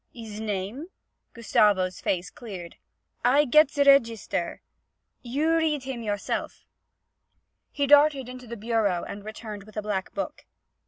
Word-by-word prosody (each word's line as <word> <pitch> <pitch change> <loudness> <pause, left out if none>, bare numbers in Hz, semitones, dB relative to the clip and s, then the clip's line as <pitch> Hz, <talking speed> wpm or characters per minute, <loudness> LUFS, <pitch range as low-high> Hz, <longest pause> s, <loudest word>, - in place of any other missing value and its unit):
'His 220 -3 -9
name?' 215 - -4 0.5
Gustavo's 210 -6 +2
face 180 0 -1
cleared. 185 -8 -9 0.5
'I 275 +5 +4
get 305 +2 +6
ze 285 -1 +1
raygeester; 230 -10 +2 0.6
you 295 +7 0
read 310 -4 +1
heem 260 -3 -5
yourself.' 205 -2 -3 1.1
He 285 - 0
darted 290 -2 +5
into 250 0 -9
the 235 +1 -7
bureau 215 -5 0
and 200 0 -7
returned 215 -1 -7
with 215 0 -14
a - - 0
black 200 -3 -3
book. - - -5
230 Hz, 130 wpm, -26 LUFS, 205-275 Hz, 1.1 s, get